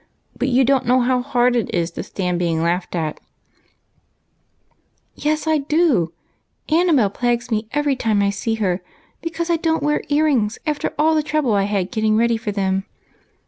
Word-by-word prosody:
But 255 - -1
you 260 0 +3
don't 265 -2 +2
know 250 +1 +4
how 250 0 +1
hard 245 -1 +2
it 235 - -1
is 170 -1 0
to - - -6
stand 180 -2 -3
being 165 -2 0
laughed 175 +2 -1
at." 155 -3 -3 1.0
" - - -45 0.3
Yes, 305 +1 -1
I 315 -1 +2
do! 285 - +2 0.6
Ariadne 320 - +4
plagues 240 +3 -1
me 220 0 -1
every 290 -2 +1
time 215 -5 +1
I 200 - +2
see 225 +3 -2
her, 190 -4 -1 0.4
because 335 +1 -3
I 335 - +3
don't 325 0 0
wear 295 0 +1
ear 295 +1 +3
rings 235 -7 +1
after 300 -2 -1
all 315 +1 +3
the 310 - +2
trouble 300 -5 0
I 200 -1 +2
had 200 -2 -1
getting 220 -2 +1
ready 235 +1 +3
for 220 -2 -4
them." 195 -1 -1
240 Hz, 185 wpm, -20 LUFS, 200-295 Hz, 1.0 s, know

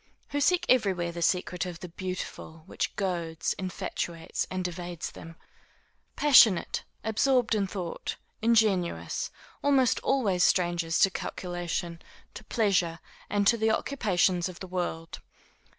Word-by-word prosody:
who 285 0 -1
seek 360 +5 +3
everywhere 190 -8 +2
the 170 0 -6
secret 180 0 0
of 180 -3 -6
the 180 - -8
beautiful 180 -2 -6
which - - -3
goads, 170 -5 -2
infatuates, 170 -3 -3
and 185 -1 -2
evades 175 -1 -6
them? 165 0 -11 0.8
passionate, 245 -10 +5 0.2
absorbed 240 +2 +2
in 205 -3 +1
thought, 185 -3 -5 0.3
ingenuous, 215 -6 +1 0.3
almost 270 -3 +3
always 205 -10 +1
strangers 175 -2 +2
to 195 - +5
calculation, 175 -2 -4 0.3
to - - -9
pleasure, 185 -7 +1 0.3
and 205 -1 +1
to 235 +3 +5
the 220 0 +2
occupations 190 -7 +1
of 175 - -10
the - - -6
world? 175 -3 -4
185 Hz, 125 wpm, -28 LUFS, 175-220 Hz, 0.8 s, passionate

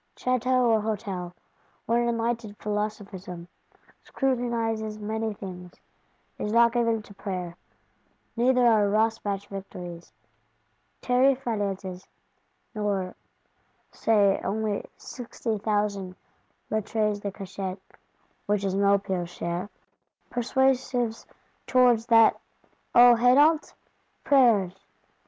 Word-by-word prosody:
Château 255 0 +1
or 225 -3 +3
Hôtel, 200 -5 -4 0.5
were 235 +1 +2
an 235 - +1
enlightened 230 -2 -2
Philosophism 205 -4 -5 0.6
scrutinises 230 -5 -1
many 220 +1 -2
things, 180 -3 -9 0.7
is 210 - -2
not 235 +1 +5
given 230 -2 +1
to 205 - -14
prayer: 185 -3 -5 0.8
neither 250 +1 +3
are 215 -3 +4
Rossbach 210 -2 0
victories, 180 -3 -8 0.9
Terray 255 +2 +4
Finances, 200 -7 -4 0.7
nor, 200 -3 -2 0.8
say 205 -3 +2
only 215 -1 -1
"sixty 230 -3 -5
thousand 205 -3 -1 0.6
Lettres 215 -1 0
de 200 0 -4
Cachet" 195 -1 -6 0.7
(which 205 -1 0
is 190 - -1
Maupeou's 195 -3 +1
share), 175 +2 -4 0.6
persuasives 250 -2 0 0.4
towards 245 -3 +4
that. 225 -1 +5 0.5
O 245 0 +9
Hénault! 290 +6 +4 0.5
Prayers? 215 - +3
215 Hz, 95 wpm, -26 LUFS, 195-235 Hz, 0.9 s, O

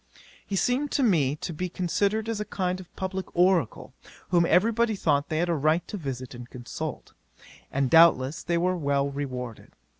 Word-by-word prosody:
He 200 - -4
seemed 250 +8 +1
to 275 - +2
me 150 - +3
to 165 - -5
be 180 +4 -3
considered 200 +5 0
as 225 -2 -2
a - - -1
kind 185 -2 -2
of 185 - -13
publick 190 0 -4
oracle, 175 - +2 0.4
whom 170 -2 +3
every 185 +7 +4
body 230 -1 +1
thought 145 -6 +1
they 155 - -1
had 175 +2 +1
a 170 - +1
right 155 +3 +1
to - - -6
visit 130 -8 -5
and 120 0 -10
consult; 120 -1 -7 0.6
and 140 0 +1
doubtless 160 -2 +5
they 170 -1 0
were 180 +2 +1
well 140 -3 0
rewarded. 125 -5 -6
170 Hz, 185 wpm, -26 LUFS, 140-190 Hz, 0.6 s, doubtless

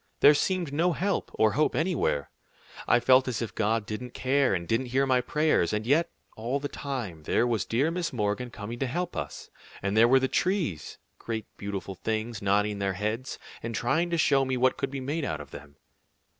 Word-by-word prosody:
"There 145 - +9
seemed 175 -1 0
no 170 +4 +2
help 195 +3 -1
or 110 -1 +4
hope 150 +9 +1
anywhere. 160 - 0 0.6
I 120 - +5
felt 130 +2 +5
as 120 -4 -2
if 115 - -4
God 110 0 0
didn't 120 +4 -6
care 130 -4 +2
and 85 -1 -4
didn't 120 +3 0
hear 135 +3 +2
my 130 -2 +3
prayers; 150 - +1
and 105 +1 -1
yet, 150 +7 +3 0.3
all 120 +5 -2
the 145 - -3
time, 120 - -5
there 80 - +1
was 115 -3 0
dear 135 +8 +1
Miss 170 -1 -2
Morgan 115 +1 -1
coming 115 +1 -7
to 135 - 0
help 175 +7 -3
us, - - -6 0.3
and 100 +1 -2
there 115 +2 +7
were 135 +2 +5
the 130 - +1
trees, 170 - -1 0.2
great 110 -2 -4
beautiful 100 -1 -5
things, 110 +3 -3
nodding 100 +1 +1
their 100 -1 0
heads, 110 +6 -3 0.2
and 115 0 -4
trying 135 +10 +1
to 170 - 0
show 140 -4 +4
me 130 -1 -1
what 130 +1 +3
could - - -2
be 140 0 -5
made 145 +5 -2
out 80 - -2
of 75 - -10
them. 75 0 -11
125 Hz, 205 wpm, -28 LUFS, 105-140 Hz, 0.6 s, There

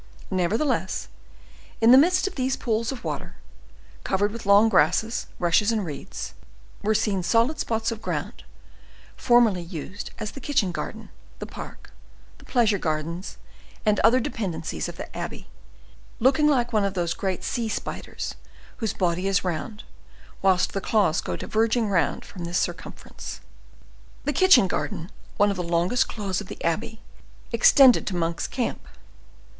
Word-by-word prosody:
Nevertheless, 190 - 0 0.7
in 225 +1 +6
the 255 - +10
midst 365 +6 +3
of 390 - -2
these 265 -2 0
pools 225 0 -1
of 255 -2 -8
water, - - -5 0.7
covered 205 +2 +1
with 230 -2 -8
long 200 +2 +7
grass, 205 +4 +2
rushes, 180 +5 +3
and 215 -4 -1
reeds, 145 -4 -7 0.5
were 215 +1 +1
seen 210 -3 +1
solid 235 - +2
spots 225 -3 -1
of 225 -1 -6
ground, - - -4 0.7
formerly 240 -7 +4
used 170 +3 -7
as 215 -2 -4
the - - -9
kitchen 240 -9 +1
garden, - - -6 0.3
the - - -6
park, - - -10 0.5
the - - -16
pleasure 220 -5 +2
gardens, 165 +3 -3 0.5
and 210 -2 +3
other 235 +3 +5
dependencies 190 - -3
of - - -9
the - - -8
abbey, - - -6 0.7
looking 270 +5 +4
like 245 -5 +2
one 215 -2 +3
of 200 -1 -1
those 175 -2 0
great 190 -2 -3
sea 230 -2 -2
spiders, 205 - -5 0.4
whose 220 -4 -2
body 180 0 0
is 195 -2 +2
round, 185 +5 -4 0.6
whilst 190 -1 +3
the 195 - -2
claws 195 -6 +2
go - - -3
diverging 225 0 0
round 175 -7 0
from 175 -3 -8
this 175 +1 -1
circumference. - - -5 0.8
The 295 - -1
kitchen 280 - +6
garden, 160 +1 -3 0.3
one 205 0 +4
of 200 - -4
the - - -1
longest 175 +9 +1
claws 200 -3 -3
of 205 - -9
the - - -9
abbey, 215 +6 -2 0.5
extended 275 - +6
to 190 - -2
Monk's 170 -1 -1
camp. 245 -2 -3
210 Hz, 150 wpm, -25 LUFS, 180-235 Hz, 0.8 s, the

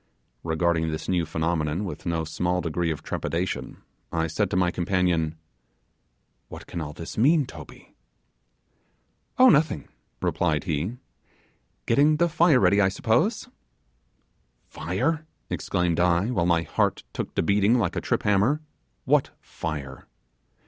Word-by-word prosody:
Regarding 80 0 +1
this 80 0 -5
new 85 -3 0
phenomenon 80 +2 -1
with 90 - -7
no 85 -1 0
small 90 +3 -1
degree 85 0 -1
of 80 -3 -4
trepidation, 85 +5 -3 0.3
I 80 -1 0
said 80 0 -1
to - - -1
my 90 -1 +2
companion, 85 -3 0 1.1
'What - - -10
can 85 - -5
all 75 -1 -5
this 85 +6 -7
mean, 145 +4 +4
Toby?' - - -12 1.4
'Oh, 255 0 +8
nothing,' 150 - +2 0.3
replied 80 -3 0
he; 85 +8 -2 0.9
'getting 150 +2 +4
the 170 +1 +2
fire 165 -4 +4
ready, 100 +2 +4
I 95 - +4
suppose.' 95 - 0 1.2
'Fire!' 135 - -2 0.3
exclaimed 90 -2 0
I, 90 +5 +2
while 85 -8 +1
my 85 -1 +2
heart - - 0
took - - -5
to - - +1
beating 100 +6 +3
like 115 - 0
a - - -1
trip - - -1
hammer, 105 +9 +2 0.5
'what - - +3
fire? 70 -5 -6
90 Hz, 135 wpm, -25 LUFS, 80-105 Hz, 1.4 s, Oh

